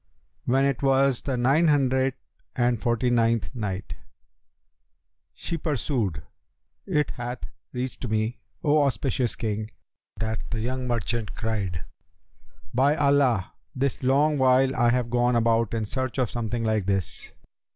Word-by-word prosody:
When 135 +2 +3
it 140 -3 0
was 135 -2 +3
the 135 -3 -2
Nine 135 +7 +3
Hundred 130 -3 +2 0.4
and 120 -2 +1
Forty 120 0 +1
ninth 115 0 +2
Night, 105 -5 -4 1.4
She 170 - -4
pursued, 120 - -1 0.6
It 150 -6 +1
hath 120 0 -5 0.3
reached 125 0 -4
me, 110 +2 -1 0.2
O 150 0 +4
auspicious 130 -2 0
King, 110 -2 -3 0.5
that 110 +2 -2
the 115 - -2
young 125 +3 -2
merchant 115 -2 -2
cried, 100 -8 -2 0.9
"'By 140 +4 +3
Allah 140 - +2 0.2
this 135 0 -1
long 140 +3 +3
while 130 +1 +4
I 120 -1 +3
have 120 -1 0
gone 120 0 +2
about 115 -1 +2
in 110 -1 -1
search 130 +4 -3
of 125 -4 0
something 120 0 -2
like 110 -4 0
this!' 95 -3 -1
125 Hz, 130 wpm, -26 LUFS, 110-135 Hz, 1.4 s, O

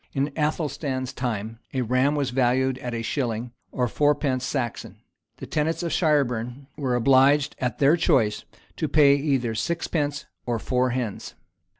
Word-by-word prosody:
In 140 +2 0
Athelstan's 150 -4 -2
time, 115 -3 -4 0.2
a 130 - +1
ram 130 +5 +2
was 140 -3 -1
valued 130 +1 +1
at 120 -2 -4
a 115 - -3
shilling, 120 -2 -2 0.2
or 125 -1 0
fourpence 145 0 +1
Saxon.[] 130 -4 -3 0.4
The - - -7
tenants 160 +3 -1
of 170 - -2
Shireburn 135 -5 0
were 130 -4 -1
obliged, 135 +3 +4
at 125 -3 -2
their 145 +3 +5
choice, 110 -10 +2 0.3
to - - -1
pay 145 -2 +5
either 135 -5 0
sixpence 150 +1 -2 0.2
or 120 -1 -1
four 125 +3 0
hens. 120 -4 -4
130 Hz, 150 wpm, -25 LUFS, 120-145 Hz, 0.4 s, their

